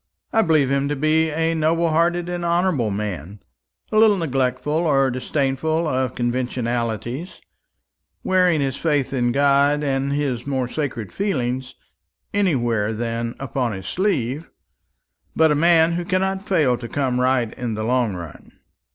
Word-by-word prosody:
I 225 - +4
believe 155 -8 +2
him 140 0 +1
to 145 - -1
be 155 +3 +2
a 165 +2 0
noble 165 +1 +1
hearted 170 +2 +1
and 175 -1 -4
honourable 170 - +1
man; 100 -2 -5 0.5
a 215 - +1
little 215 -2 +5
neglectful 135 -3 -1
or 135 -3 +3
disdainful 140 +5 -1
of 130 -3 -1
conventionalities, 120 - -2 0.8
wearing 180 -4 +3
his 135 -2 -1
faith 145 -4 0
in 120 -2 +1
God 140 +2 +3
and 135 -1 0
his 140 -4 -2
more 130 -3 -1
sacred 130 -7 -4
feelings 130 -10 -2 0.6
anywhere 120 - +1
than 115 +1 -3
upon 130 -3 -2
his 95 -1 -7
sleeve; 155 - -1 0.9
but 160 -1 +4
a - - +4
man 165 +1 +4
who 175 +1 -2
cannot 190 +1 0
fail 155 -11 +2
to 120 - -6
come 130 -3 0
right 125 -3 +1
in 120 -3 -4
the 110 - -3
long 120 -3 +1
run." 85 -5 -10
140 Hz, 145 wpm, -22 LUFS, 120-165 Hz, 0.9 s, little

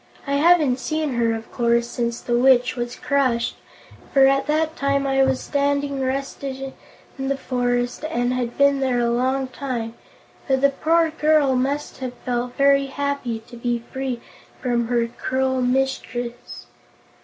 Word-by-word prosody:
I 280 - -2
haven't 300 -5 +4
seen 310 0 -2
her, 235 -1 +1
of 225 0 -8
course, 235 -1 +1
since 235 -1 -3
the 240 - -1
Witch 250 0 +4
was 240 0 -4
crushed, 255 -4 0 0.6
for 270 -1 +6
at 275 0 +3
that 315 +1 +1
time 280 0 0
I 270 0 +2
was 265 -1 +2
standing 280 -1 -1
rusted 270 0 -3 0.5
in 270 - -2
the 275 0 0
forest 245 -1 -1
and 245 -4 0
had 245 -2 -3
been 280 0 +4
there 260 -2 +1
a 235 0 +1
long 260 +2 0
time, 245 -4 -4 0.5
but 265 -1 +2
the 280 0 +5
poor 325 +3 +2
girl 305 -4 +3
must 280 +3 -2
have 255 -1 -5
felt 245 0 -2
very 275 0 +4
happy 275 -5 -3
to 240 - -12
be 240 0 -2
free 265 -2 -3 0.4
from 240 -2 0
her 240 -1 +1
cruel 260 +2 -1
mistress." 250 -2 -2
265 Hz, 155 wpm, -22 LUFS, 245-280 Hz, 0.6 s, for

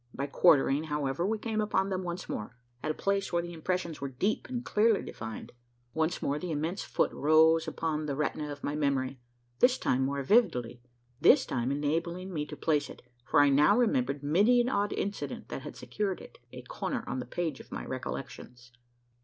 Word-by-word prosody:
By 140 - -2
quartering, 145 0 +4
however, 150 +2 -1
we 220 +1 0
came 220 0 -2
upon 195 -2 +1
them 190 -1 -1
once 175 0 -5
more 115 +4 -5 0.2
at - - -3
a - - +1
place 200 0 -1
where 170 -1 +1
the 175 0 -7
impressions 170 -1 -3
were 140 - -3
deep 190 +12 -1
and 245 -1 -4
clearly 215 0 +3
defined. 110 0 -7 0.4
Once 160 +2 -1
more 145 +1 0
the 180 - -5
immense 160 +5 -2
foot - - 0
rose 160 +2 +4
upon 155 -1 -2
the 140 - -2
retina 150 0 -2
of 145 0 -9
my 145 - -2
memory 135 -3 0 0.4
this 250 +1 +5
time 130 +1 +1
more 140 +1 -1
vividly 125 - +2 0.4
this - - +6
time 125 +1 -1
enabling 165 +6 -2
me 150 -2 -2
to - - -8
place 150 -3 +1
it: - - -12 0.2
for - - +4
I 145 - +5
now 150 +10 +5
remembered 140 - +1
many 200 +12 +4
an 240 +1 +2
odd 205 -5 0
incident 200 +1 -4
that - - -5
had - - -8
secured 200 -3 -3
it - - -13
a - - -9
corner - - -4
on - - -3
the 125 - -4
page 160 0 -3
of - - -14
my - - -5
recollections. 120 0 -7
155 Hz, 195 wpm, -30 LUFS, 140-190 Hz, 0.4 s, this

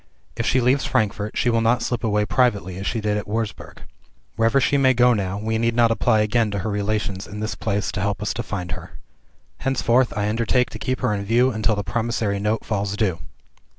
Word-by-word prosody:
If - - -2
she 130 - +3
leaves 130 +3 +2
Frankfort, 105 0 -1
she 120 - +2
will 115 0 +2
not 115 +2 +2
slip 120 -2 -2
away 105 -1 +1
privately 100 -7 0
as 95 - -4
she 115 - -1
did 105 0 0
at - - -8
Wurzburg. 110 0 -4 0.5
Wherever 115 +4 +3
she 135 - +2
may 130 -2 +4
go 125 +1 +5
now, 95 -3 -2
we 110 +2 -1
need 115 0 +1
not 120 -1 +4
apply 110 0 +2
again 110 +1 +1
to 100 - -3
her 110 - -1
relations 100 -1 -2
in 105 +1 -7
this 110 +1 -2
place 100 -2 -2
to 100 - -3
help 100 -1 -1
us 105 - -1
to - - -3
find 90 -3 -5
her. 90 -5 -8 0.6
Henceforth 130 -1 +2
I 105 0 0
undertake 115 +2 +1
to 110 - -8
keep 130 +3 -2
her 105 - +1
in 100 -1 -2
view 120 +5 +3
until 110 -1 0
the 105 - -3
promissory 110 0 -1
note 105 +2 -1
falls 105 -1 -2
due. 95 -7 0
110 Hz, 220 wpm, -22 LUFS, 100-120 Hz, 0.6 s, go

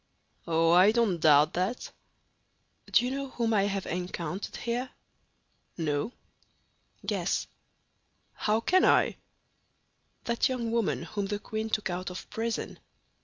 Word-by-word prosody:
"Oh, 165 0 +3
I 185 +4 +7
don't 220 -7 +1
doubt 150 -1 +5
that." 190 +8 -2 1.0
"Do 245 - +5
you 250 - -1
know 275 0 -3
whom 230 -3 -1
I 200 -2 +3
have 195 -1 -2
encountered 180 0 -4
here?" 240 +2 -2 0.9
"No." 155 +4 -1 0.9
"Guess." - - 0 0.9
"How 215 +1 0
can 370 +9 +3
I?" - - +4 1.1
"That 235 +2 +1
young 240 -3 -2
woman 230 -6 0
whom 195 +4 -3
the 205 0 -2
queen 220 +1 -4
took 215 -4 -1
out 180 +1 -3
of 180 - -8
prison." 225 +1 -3
205 Hz, 125 wpm, -29 LUFS, 180-235 Hz, 1.1 s, I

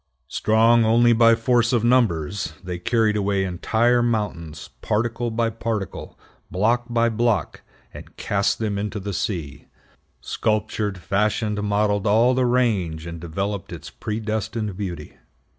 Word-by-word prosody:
Strong 115 +2 +3
only 120 +2 +4
by 115 0 +5
force 120 +1 +2
of 120 -3 +1
numbers, 100 -9 +1
they 90 -1 -5
carried 110 +2 +1
away 100 -1 0
entire 110 +7 +1
mountains, 95 -10 -3
particle 120 +2 -1
by 115 +1 0
particle, 115 -3 -4 0.3
block 115 +7 +1
by 120 0 +2
block, 115 -1 0 0.3
and - - -12
cast 100 -1 0
them 105 -3 -2
into 105 +1 -3
the 100 +1 -5
sea; 80 - -4 0.5
sculptured, 105 -2 -2
fashioned, 105 +3 -1
modeled 105 0 0
all 115 +5 +4
the 130 -1 +1
range, 100 -11 0
and 85 -1 -7
developed 95 +4 -4
its - - -8
predestined 110 -2 -3
beauty. 90 -6 -6
105 Hz, 130 wpm, -22 LUFS, 95-115 Hz, 0.5 s, by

